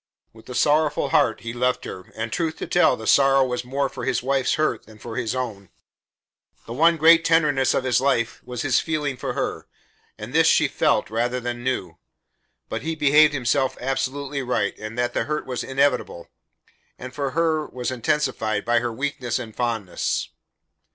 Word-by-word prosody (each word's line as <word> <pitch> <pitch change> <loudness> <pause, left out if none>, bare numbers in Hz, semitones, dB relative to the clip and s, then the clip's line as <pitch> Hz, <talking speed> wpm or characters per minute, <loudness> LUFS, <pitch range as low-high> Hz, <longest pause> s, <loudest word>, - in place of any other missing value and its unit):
With 110 +2 -17
a 125 - -6
sorrowful 150 +2 +2
heart 115 -3 +2
he 115 0 -5
left 125 +1 0
her, 95 0 -9
and 110 0 -4
truth 165 -2 -2
to - - -5
tell, 175 -7 +3
the 110 - -8
sorrow 135 +1 +5
was 125 -1 -3
more 135 +3 -1
for 130 -2 -8
his 125 -2 -1
wife's 135 0 +1
hurt 155 -9 -1
than 110 -1 -15
for 110 +1 -8
his 115 +2 -2
own. 105 -7 -5 1.0
The 115 - -7
one 165 +5 +4
great 165 +2 +6
tenderness 150 -6 +2
of 135 - 0
his 130 -1 +2
life 125 -4 0
was 125 -1 -5
his 135 -4 +3
feeling 150 -4 -2
for - - -4
her, - - -3 0.5
and - - -8
this - - +4
she - - +4
felt - - +1
rather 120 +3 0
than 120 0 -5
knew; 95 -10 -3 0.7
but - - -4
he 160 +2 -3
believed 150 0 +5
himself 130 +1 0
absolutely 135 +2 -2
right 120 -5 -1
and 110 +2 -7
that 120 0 0
the - - -1
hurt 150 0 -3
was 125 -2 -4
inevitable, 135 -10 0 0.7
and 130 0 -9
for 140 -1 -2
her 160 -2 +1
was 125 0 -4
intensified 115 -4 -1
by 120 0 +3
her 120 0 -3
weakness 125 -1 -2
and 110 -2 -8
fondness. 115 -6 -2
130 Hz, 185 wpm, -23 LUFS, 120-145 Hz, 1.0 s, great